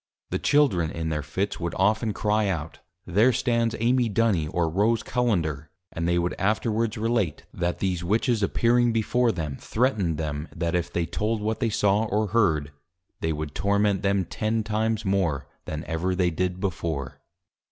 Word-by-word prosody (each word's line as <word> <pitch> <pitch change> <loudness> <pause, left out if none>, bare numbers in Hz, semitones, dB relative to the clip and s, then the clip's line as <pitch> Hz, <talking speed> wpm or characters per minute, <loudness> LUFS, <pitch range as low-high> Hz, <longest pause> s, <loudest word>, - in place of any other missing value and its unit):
_ - - -41
The - - 0
Children 130 - +3
in 80 0 -3
their 75 -2 -1
Fits 95 +7 -3
would 85 -1 -3
often 105 +3 +2
Cry 105 0 +1
out, 80 -5 -3 0.3
There 105 +8 +4
stands 115 -2 +1
Amy 120 +1 +2
Duny, 100 -8 +1
or 85 -2 +1
Rose 105 +8 +1
Cullender; 85 - 0 0.2
and 85 0 -2
they 85 0 +2
would 85 0 0
afterwards 110 +2 0
relate, 110 -7 -1
_That 85 0 -1
these 90 -3 -1
Witches 110 +4 +1
appearing 120 +3 +3
before 115 +2 +2
them, 75 -8 -4
threatned 110 - 0
them, 75 -1 -3
that 85 0 -1
if 90 -1 -1
they 85 - 0
told 105 +6 -1
what 110 +1 -2
they 115 - +1
saw 105 0 +2
or 105 0 0
heard, 80 -10 +2 0.5
they 80 - -1
would 75 -2 -4
Torment 100 0 +1
them 100 -1 +1
ten 110 +4 -1
times 110 +1 -1
more 90 -8 0 0.2
than 75 0 -4
ever 90 +3 -1
they 90 -1 +2
did 90 +2 -2
before. 80 -8 -3
100 Hz, 175 wpm, -25 LUFS, 85-110 Hz, 0.5 s, There